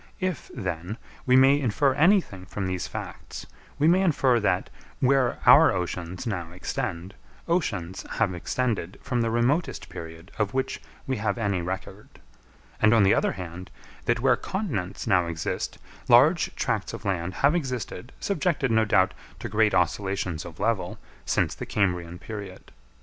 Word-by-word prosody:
If, 185 Hz, -3 st, -3 dB
then, 90 Hz, +3 st, -4 dB, 0.3 s
we 125 Hz, -, +5 dB
may 135 Hz, +2 st, +6 dB
infer 135 Hz, +1 st, +2 dB
anything 150 Hz, -, +2 dB
from 95 Hz, +2 st, -4 dB
these 95 Hz, -1 st, -2 dB
facts, -, -, -7 dB, 0.3 s
we 150 Hz, +2 st, +3 dB
may 180 Hz, +3 st, +5 dB
infer 135 Hz, -9 st, +3 dB
that, 90 Hz, -3 st, 0 dB, 0.3 s
where 130 Hz, -1 st, +3 dB
our -, -, +8 dB
oceans 90 Hz, -1 st, -4 dB
now 90 Hz, -7 st, -3 dB
extend, 90 Hz, +1 st, -4 dB, 0.3 s
oceans 100 Hz, -, -1 dB
have 105 Hz, -5 st, +1 dB
extended 100 Hz, 0 st, -2 dB
from 125 Hz, -4 st, 0 dB
the 115 Hz, -, +1 dB
remotest 120 Hz, +9 st, 0 dB
period 80 Hz, +3 st, -9 dB
of 105 Hz, +2 st, 0 dB
which 130 Hz, 0 st, -1 dB, 0.2 s
we 130 Hz, -2 st, -1 dB
have 105 Hz, 0 st, -1 dB
any 100 Hz, -5 st, 0 dB
record; 95 Hz, +3 st, -7 dB, 0.6 s
and 105 Hz, +2 st, +6 dB
on 110 Hz, -, +5 dB
the 95 Hz, -, +5 dB
other -, -, +1 dB
hand, 90 Hz, 0 st, -8 dB, 0.4 s
that 120 Hz, 0 st, +2 dB
where 130 Hz, -1 st, +4 dB
continents 125 Hz, -, -3 dB
now 90 Hz, -5 st, +3 dB
exist, 80 Hz, -1 st, -3 dB, 0.3 s
large 150 Hz, +8 st, +5 dB
tracts -, -, -1 dB
of -, -, -8 dB
land 90 Hz, -2 st, -1 dB
have 145 Hz, -, +5 dB
existed, 130 Hz, -, -3 dB
subjected, 165 Hz, -8 st, 0 dB
no 110 Hz, 0 st, +4 dB
doubt, 95 Hz, -3 st, +3 dB, 0.2 s
to -, -, -5 dB
great 105 Hz, -2 st, +3 dB
oscillations 90 Hz, -1 st, 0 dB
of 85 Hz, -3 st, -10 dB
level, 110 Hz, -6 st, -1 dB, 0.3 s
since -, -, +1 dB
the -, -, -7 dB
Cambrian 90 Hz, -4 st, -1 dB
period. 100 Hz, -1 st, -8 dB
105 Hz, 155 wpm, -26 LUFS, 90-130 Hz, 0.6 s, our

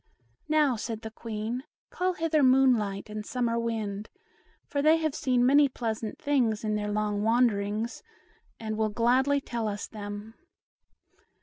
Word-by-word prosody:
"Now," 300 Hz, -5 st, +3 dB
said 220 Hz, 0 st, -4 dB
the 220 Hz, -, -6 dB
Queen, 225 Hz, +2 st, -4 dB, 0.3 s
"call 365 Hz, 0 st, 0 dB
hither 325 Hz, -2 st, +1 dB
Moon 260 Hz, -1 st, +6 dB
light 200 Hz, -2 st, -3 dB
and 210 Hz, 0 st, -5 dB
Summer 235 Hz, 0 st, -1 dB
Wind, 215 Hz, -3 st, -3 dB, 0.6 s
for 285 Hz, -, -2 dB
they 310 Hz, +2 st, +5 dB
have 315 Hz, -3 st, -1 dB
seen 250 Hz, -3 st, +1 dB
many 285 Hz, +2 st, +5 dB
pleasant 225 Hz, -3 st, -4 dB
things 240 Hz, -7 st, +1 dB
in 215 Hz, -1 st, 0 dB
their 210 Hz, 0 st, -1 dB
long 210 Hz, -1 st, -1 dB
wanderings, 225 Hz, -1 st, +1 dB, 0.6 s
and 220 Hz, -1 st, -4 dB
will 215 Hz, 0 st, +2 dB
gladly 255 Hz, +6 st, +2 dB
tell 235 Hz, -4 st, -3 dB
us 205 Hz, -1 st, -3 dB
them." 205 Hz, +1 st, -7 dB
230 Hz, 145 wpm, -28 LUFS, 215-260 Hz, 0.6 s, Moon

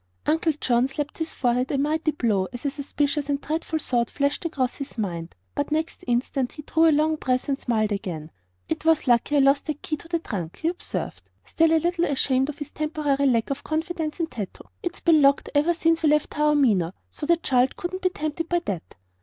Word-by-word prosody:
Uncle 320 Hz, +1 st, +2 dB
John 245 Hz, 0 st, +2 dB
slapped 295 Hz, +3 st, -5 dB
his 320 Hz, 0 st, -3 dB
forehead 250 Hz, 0 st, +1 dB
a 280 Hz, -, +1 dB
mighty 310 Hz, +3 st, +1 dB
blow 220 Hz, -10 st, +1 dB
as 245 Hz, +2 st, -8 dB
a 280 Hz, -, +1 dB
suspicious 285 Hz, 0 st, -1 dB
and 280 Hz, -1 st, +1 dB
dreadful 320 Hz, +2 st, -2 dB
thought 240 Hz, -6 st, 0 dB
flashed 280 Hz, 0 st, 0 dB
across 265 Hz, -6 st, -1 dB
his 275 Hz, -3 st, -7 dB
mind. 170 Hz, -6 st, -3 dB, 0.2 s
But 285 Hz, +1 st, -2 dB
next 315 Hz, +1 st, -2 dB
instant 245 Hz, +1 st, 0 dB
he 300 Hz, -, -9 dB
drew 325 Hz, +2 st, +3 dB
a -, -, +6 dB
long 310 Hz, +1 st, +2 dB
breath 255 Hz, -1 st, 0 dB
and 275 Hz, -1 st, 0 dB
smiled 220 Hz, -3 st, 0 dB
again. 170 Hz, -6 st, -4 dB, 0.4 s
"It -, -, -3 dB
was 320 Hz, -1 st, +3 dB
lucky 245 Hz, +3 st, +3 dB
I -, -, +6 dB
lost 275 Hz, +2 st, +3 dB
that 305 Hz, -1 st, -4 dB
key 305 Hz, -, -2 dB
to 330 Hz, -, -12 dB
the 335 Hz, 0 st, 0 dB
trunk," 185 Hz, -, -5 dB
he 325 Hz, -, +3 dB
observed, 350 Hz, -, -5 dB, 0.2 s
still 325 Hz, 0 st, +3 dB
a 325 Hz, -, +5 dB
little 345 Hz, +2 st, +1 dB
ashamed 265 Hz, -1 st, +1 dB
of 295 Hz, -, -5 dB
his 295 Hz, -, -7 dB
temporary 300 Hz, -2 st, 0 dB
lack 235 Hz, -1 st, +2 dB
of 275 Hz, -, -3 dB
confidence 320 Hz, 0 st, -2 dB
in 335 Hz, -, +2 dB
Tato. 210 Hz, -, -8 dB
"It's 350 Hz, 0 st, -4 dB
been 325 Hz, -3 st, +5 dB
locked 275 Hz, 0 st, +3 dB
ever 305 Hz, +4 st, +3 dB
since 330 Hz, 0 st, +2 dB
we 310 Hz, -, +4 dB
left 300 Hz, 0 st, +2 dB
Taormina, 270 Hz, -, +3 dB, 0.2 s
so 295 Hz, -, -6 dB
the 340 Hz, 0 st, +5 dB
child 255 Hz, -5 st, +2 dB
couldn't 370 Hz, +1 st, -4 dB
be 370 Hz, -, +3 dB
tempted 310 Hz, -1 st, -3 dB
by 350 Hz, -, +2 dB
that." 185 Hz, -5 st, -4 dB
290 Hz, 215 wpm, -25 LUFS, 250-315 Hz, 0.4 s, a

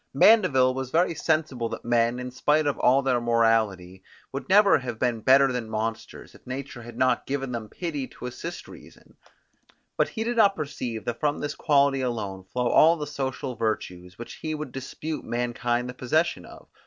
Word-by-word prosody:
Mandeville 140 Hz, -, +5 dB
was 130 Hz, -1 st, -4 dB
very 170 Hz, +4 st, +2 dB
sensible 155 Hz, -7 st, -1 dB
that -, -, -7 dB
men, 120 Hz, 0 st, +2 dB
in 125 Hz, 0 st, -6 dB
spite 150 Hz, +4 st, +1 dB
of 145 Hz, -, -1 dB
all 135 Hz, +2 st, +4 dB
their 125 Hz, -2 st, +1 dB
morality, 110 Hz, -6 st, +1 dB, 0.3 s
would 135 Hz, +8 st, -6 dB
never 200 Hz, -3 st, +6 dB
have 120 Hz, -3 st, -6 dB
been 120 Hz, -1 st, 0 dB
better 135 Hz, +2 st, +5 dB
than 120 Hz, -3 st, -4 dB
monsters, 110 Hz, +1 st, -5 dB
if -, -, -19 dB
nature 130 Hz, -1 st, -6 dB
had 120 Hz, +1 st, -11 dB
not 130 Hz, -, +1 dB
given 135 Hz, -1 st, -3 dB
them 115 Hz, -3 st, -5 dB
pity 150 Hz, -, -4 dB
to -, -, -11 dB
assist 165 Hz, +8 st, -7 dB
reason: -, -, -16 dB, 0.8 s
but -, -, +2 dB
he 225 Hz, -, -4 dB
did 235 Hz, +1 st, -2 dB
not 200 Hz, -3 st, +5 dB
perceive 125 Hz, -7 st, -5 dB
that 120 Hz, -1 st, -3 dB
from 150 Hz, -1 st, 0 dB
this 145 Hz, 0 st, -3 dB
quality 140 Hz, -3 st, +2 dB
alone 105 Hz, -7 st, -3 dB
flow 125 Hz, +6 st, -2 dB
all 165 Hz, +7 st, +5 dB
the 150 Hz, -, -4 dB
social 135 Hz, -3 st, -4 dB
virtues, 90 Hz, -5 st, -4 dB
which 120 Hz, -, -8 dB
he 155 Hz, -1 st, -4 dB
would 150 Hz, -3 st, -6 dB
dispute 150 Hz, +4 st, -6 dB
mankind 120 Hz, 0 st, -2 dB
the 125 Hz, -, -6 dB
possession 130 Hz, -, 0 dB
of. -, -, -14 dB
130 Hz, 185 wpm, -25 LUFS, 120-150 Hz, 0.8 s, never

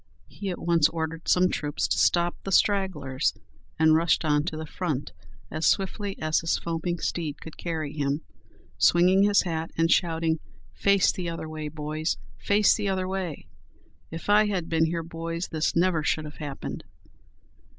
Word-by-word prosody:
He 200 Hz, -, -6 dB
at 180 Hz, -, -3 dB
once 170 Hz, -3 st, +3 dB
ordered 160 Hz, 0 st, -4 dB
some 180 Hz, 0 st, +4 dB
troops 145 Hz, -4 st, -2 dB
to -, -, 0 dB
stop 175 Hz, 0 st, +3 dB
the 195 Hz, -, -4 dB
stragglers, 150 Hz, -, +1 dB, 0.4 s
and 160 Hz, 0 st, +5 dB
rushed 165 Hz, +1 st, +3 dB
on 150 Hz, -1 st, +2 dB
to 160 Hz, -2 st, -3 dB
the 160 Hz, -, -5 dB
front 150 Hz, -4 st, -3 dB, 0.4 s
as 155 Hz, +1 st, 0 dB
swiftly 195 Hz, +1 st, 0 dB
as 155 Hz, 0 st, +1 dB
his 165 Hz, -, 0 dB
foaming 170 Hz, +1 st, -2 dB
steed 160 Hz, -3 st, -3 dB
could 160 Hz, -, -10 dB
carry 160 Hz, -4 st, -4 dB
him, 145 Hz, 0 st, -1 dB, 0.6 s
swinging 180 Hz, +3 st, +5 dB
his 205 Hz, 0 st, +4 dB
hat, 165 Hz, -3 st, -3 dB
and 165 Hz, 0 st, +2 dB
shouting, 165 Hz, -1 st, +2 dB, 0.3 s
"Face 200 Hz, -1 st, +3 dB
the 175 Hz, -2 st, -4 dB
other 165 Hz, -1 st, -5 dB
way, 155 Hz, -1 st, -5 dB
boys! 155 Hz, +1 st, -3 dB, 0.2 s
face 205 Hz, 0 st, +4 dB
the 205 Hz, -2 st, -1 dB
other 185 Hz, -1 st, -1 dB
way! 185 Hz, -5 st, -4 dB, 0.6 s
If 165 Hz, +1 st, -7 dB
I 210 Hz, +1 st, +5 dB
had 185 Hz, -5 st, -2 dB
been 160 Hz, -1 st, +3 dB
here, 165 Hz, +1 st, -2 dB
boys, 165 Hz, +1 st, -5 dB
this 155 Hz, -1 st, -1 dB
never 170 Hz, -1 st, +2 dB
should 155 Hz, +1 st, 0 dB
have 150 Hz, -, -10 dB
happened." 145 Hz, -3 st, -6 dB
165 Hz, 170 wpm, -26 LUFS, 155-185 Hz, 0.6 s, and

